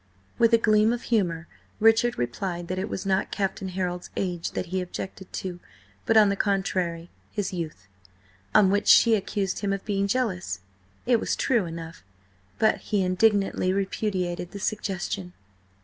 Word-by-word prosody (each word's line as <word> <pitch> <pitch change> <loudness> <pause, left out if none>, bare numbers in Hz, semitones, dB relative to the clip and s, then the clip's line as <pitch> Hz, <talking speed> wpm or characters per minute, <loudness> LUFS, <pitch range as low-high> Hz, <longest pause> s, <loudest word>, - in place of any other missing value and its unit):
With 230 -1 +5
a 230 - +7
gleam 215 0 +4
of 240 - -4
humour, 170 -6 +1 0.3
Richard 225 +2 +4
replied 170 +9 -3
that 185 0 -2
it 200 +3 -3
was 190 - -4
not 195 0 +1
Captain 195 -1 -2
Harold's 180 -1 -3
age 175 -3 -2
that - - -2
he 190 - +1
objected 190 +1 -7
to, 180 -2 -5 0.5
but, 225 - +4
on 210 -2 +7
the 200 - +1
contrary, 185 -4 -1 0.2
his 205 -2 -3
youth. 155 - -5 0.7
On 190 -2 +6
which 205 +1 +1
she 230 - +7
accused 200 -2 -1
him 200 -1 -1
of 195 0 -3
being 200 -1 0
jealous. 190 - -1 0.4
It 240 -2 +4
was - - -1
true 235 -8 +1
enough, 165 - -8 0.5
but 220 - +3
he 205 -3 0
indignantly 195 0 +2
repudiated 190 -3 -2
the 200 - -6
suggestion. 185 - -3
190 Hz, 160 wpm, -26 LUFS, 180-210 Hz, 0.7 s, a